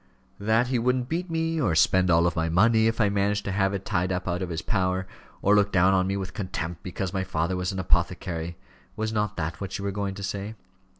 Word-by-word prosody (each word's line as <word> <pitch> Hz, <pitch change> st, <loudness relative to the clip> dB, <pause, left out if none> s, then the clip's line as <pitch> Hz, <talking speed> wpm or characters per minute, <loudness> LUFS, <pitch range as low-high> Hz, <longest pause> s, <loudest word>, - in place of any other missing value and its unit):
"That 110 Hz, +4 st, +2 dB
he 130 Hz, -2 st, +1 dB
wouldn't 125 Hz, +1 st, 0 dB
beat 175 Hz, +3 st, -2 dB
me; 165 Hz, -1 st, 0 dB
or 85 Hz, -, +1 dB
spend 95 Hz, +3 st, +4 dB
all 85 Hz, +1 st, +4 dB
my 80 Hz, -1 st, 0 dB
money 110 Hz, +6 st, +4 dB
if 115 Hz, +1 st, -1 dB
I 105 Hz, -, +4 dB
managed 100 Hz, +1 st, 0 dB
to 100 Hz, -, -2 dB
have 95 Hz, 0 st, +1 dB
it 100 Hz, -1 st, -4 dB
tied 90 Hz, +1 st, 0 dB
up 90 Hz, 0 st, -2 dB
out 90 Hz, 0 st, -1 dB
of 90 Hz, -, -3 dB
his 80 Hz, -1 st, -4 dB
power; 95 Hz, -2 st, 0 dB, 0.4 s
or 100 Hz, -, +5 dB
look 105 Hz, 0 st, +3 dB
down 95 Hz, +1 st, +4 dB
on 95 Hz, -1 st, +2 dB
me 100 Hz, +1 st, -1 dB
with 95 Hz, -1 st, -5 dB
contempt 90 Hz, -5 st, -4 dB
because 95 Hz, +1 st, -4 dB
my 95 Hz, -1 st, 0 dB
father 90 Hz, -1 st, -1 dB
was 90 Hz, +1 st, -1 dB
an 95 Hz, -, -5 dB
apothecary! 85 Hz, -2 st, -1 dB, 0.4 s
Was 110 Hz, 0 st, -2 dB
not 105 Hz, -1 st, -1 dB
that 80 Hz, +3 st, -3 dB
what 100 Hz, -1 st, -4 dB
you 100 Hz, -, -5 dB
were 100 Hz, -, 0 dB
going 100 Hz, -1 st, -3 dB
to 100 Hz, -, -7 dB
say?" 100 Hz, +3 st, -4 dB
95 Hz, 240 wpm, -26 LUFS, 90-105 Hz, 0.4 s, or